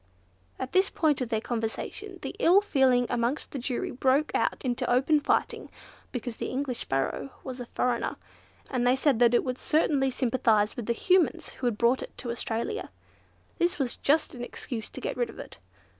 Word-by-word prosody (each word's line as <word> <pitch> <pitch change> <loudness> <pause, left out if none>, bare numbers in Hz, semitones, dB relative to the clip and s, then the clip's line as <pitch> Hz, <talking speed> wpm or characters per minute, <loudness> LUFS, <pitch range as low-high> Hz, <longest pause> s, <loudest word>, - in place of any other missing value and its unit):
At 260 - -5
this 380 +1 +3
point 300 -4 +1
of 245 - -2
their 220 -2 +1
conversation, 240 - -4
the - - -5
ill 360 +4 +6
feeling 265 -10 +3
amongst 245 +4 -1
the 275 - -4
jury 250 0 -2
broke 270 +4 +2
out - - 0
into 245 -1 0
open 275 +5 +4
fighting, 290 - 0 0.4
because 245 -2 -4
the - - -3
English 260 -2 -2
Sparrow 135 +1 -2
was 260 -1 -6
a 245 - -6
foreigner, 245 -1 -1 0.6
and 245 -2 +1
they 250 - +5
said 265 -3 +2
that 240 0 +5
it - - +3
would 255 -1 -3
certainly 290 -3 +2
sympathise 230 -4 +2
with 240 - -5
the 235 - +2
Humans 360 +2 +2
who 250 - -2
had 225 -3 0
brought 240 +3 +3
it - - -9
to 240 - -3
Australia. 235 - -3 0.7
This 350 +1 +2
was 265 -4 -1
just 305 +2 +2
an 245 -2 -6
excuse 235 -2 -6
to - - -8
get - - -3
rid 480 -2 0
of - - -11
it. - - -10
255 Hz, 190 wpm, -28 LUFS, 235-285 Hz, 0.7 s, ill